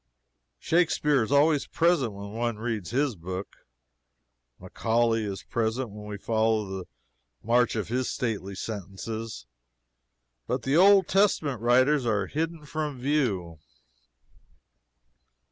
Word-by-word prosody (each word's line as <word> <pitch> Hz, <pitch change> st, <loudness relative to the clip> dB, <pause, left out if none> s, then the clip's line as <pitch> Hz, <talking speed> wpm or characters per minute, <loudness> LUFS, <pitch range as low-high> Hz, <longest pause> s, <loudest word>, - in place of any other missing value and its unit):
Shakspeare 150 Hz, -, +2 dB
is 110 Hz, -, -2 dB
always 145 Hz, +1 st, +3 dB
present 165 Hz, -10 st, +2 dB
when 100 Hz, +1 st, -8 dB
one 115 Hz, 0 st, -2 dB
reads 110 Hz, -5 st, -3 dB
his 135 Hz, 0 st, 0 dB
book; 90 Hz, +2 st, -6 dB, 1.0 s
Macaulay 115 Hz, 0 st, 0 dB
is 100 Hz, -2 st, -5 dB
present 115 Hz, +1 st, -2 dB
when 105 Hz, 0 st, -9 dB
we 105 Hz, -1 st, -5 dB
follow 110 Hz, 0 st, +1 dB
the 95 Hz, -1 st, -6 dB, 0.6 s
march 120 Hz, +2 st, +2 dB
of 110 Hz, -2 st, -3 dB
his 125 Hz, +2 st, -1 dB
stately 100 Hz, -5 st, -3 dB
sentences; 105 Hz, -, -6 dB, 1.0 s
but 125 Hz, -2 st, -2 dB
the 135 Hz, +4 st, +1 dB
Old 195 Hz, +1 st, +6 dB
Testament 155 Hz, -, +2 dB
writers 130 Hz, +4 st, +4 dB
are 105 Hz, -3 st, +1 dB
hidden 160 Hz, 0 st, -3 dB
from 150 Hz, -3 st, -4 dB
view. 115 Hz, -, -1 dB
115 Hz, 115 wpm, -27 LUFS, 105-145 Hz, 1.0 s, Old